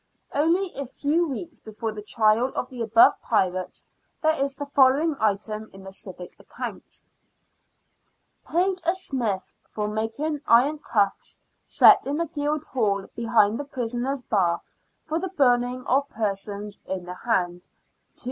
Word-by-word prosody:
Only 340 +6 +1
a 280 -1 -4
few 310 +7 0
weeks 315 +3 -6
before 220 +1 -5
the 210 -1 -7
trial 220 +4 +2
of 255 - -3
the 250 -2 -6
above 225 0 +5
pirates 185 -4 -1 0.4
there 315 0 +4
is 275 -2 -1
the 285 - -5
following 280 +3 +4
item 215 +1 -1
in 195 0 -12
the 190 - -9
civic 185 -2 -8
accounts: - - -8 0.6
— - - -47
" - - -39
Paid 365 +2 +1
a 345 +2 +2
smith 235 - -2 0.2
for 210 -1 -3
making 225 +8 -2
iron 275 +6 +4
cuffs, 205 -8 0 0.2
set - - +6
in 285 +2 -1
the 335 - 0
Guildhall 275 - -1
behind 230 -1 +2
the - - -2
prisoners' 250 0 -3
bar, 175 -7 +1 0.4
for 315 +1 -1
the 380 +2 -3
burning 250 -6 +2
of 280 +2 +1
persons 205 -1 -4
in 185 -2 -4
the 180 - -6
hand, 180 -4 -1 0.5
2s. - - -15
240 Hz, 150 wpm, -25 LUFS, 210-290 Hz, 0.6 s, set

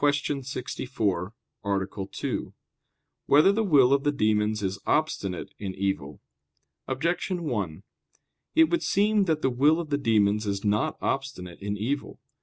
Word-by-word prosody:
64, 130 -8 -1 0.3
Art. 95 -1 -2
2] - - -3 0.7
Whether 150 +7 +6
the 220 +2 +1
Will 140 -9 +5
of 140 0 +2
the 145 - +2
Demons 105 -4 +1
Is 95 +1 -2
Obstinate 100 - -1
in 95 -2 -5
Evil? 85 -8 -2 0.7
Objection 170 +6 -1
1: 105 - -3 0.7
It 320 0 +5
would 340 - +2
seem 210 0 +2
that 160 -3 0
the 130 - +2
will 145 +6 +4
of 160 -3 -5
the 145 - +1
demons 105 -4 +2
is 100 +1 -2
not 105 +1 +1
obstinate 100 -11 -3
in 100 +1 -3
evil. 135 +7 -3
125 Hz, 140 wpm, -27 LUFS, 100-145 Hz, 0.7 s, Whether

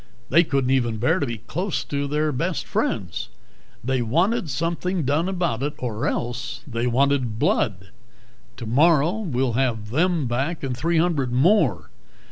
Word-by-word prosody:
They 170 - +6
couldn't 135 -5 0
even 120 -4 +1
bear 160 +11 +2
to 140 - -1
be 115 -1 -4
close 175 - -3
to 140 0 -2
their 150 +2 0
best 165 +6 -2
friends. - - -2 0.5
They 130 +1 0
wanted 170 - +1
something 170 +5 -1
done 150 +7 +1
about 175 -10 -1
it, 145 +2 -2
or 115 -2 -3
else 120 +1 -3
they 120 -2 -2
wanted 130 -2 +1
blood. 95 -4 0 0.7
Tomorrow 150 - +3
we'll 135 - -1
have 115 -4 -1
them 165 +2 +1
back 135 +8 -2
and 130 -2 -2
three 165 +6 0
hundred 160 -7 +1
more. 130 - +2
140 Hz, 150 wpm, -23 LUFS, 120-165 Hz, 0.7 s, They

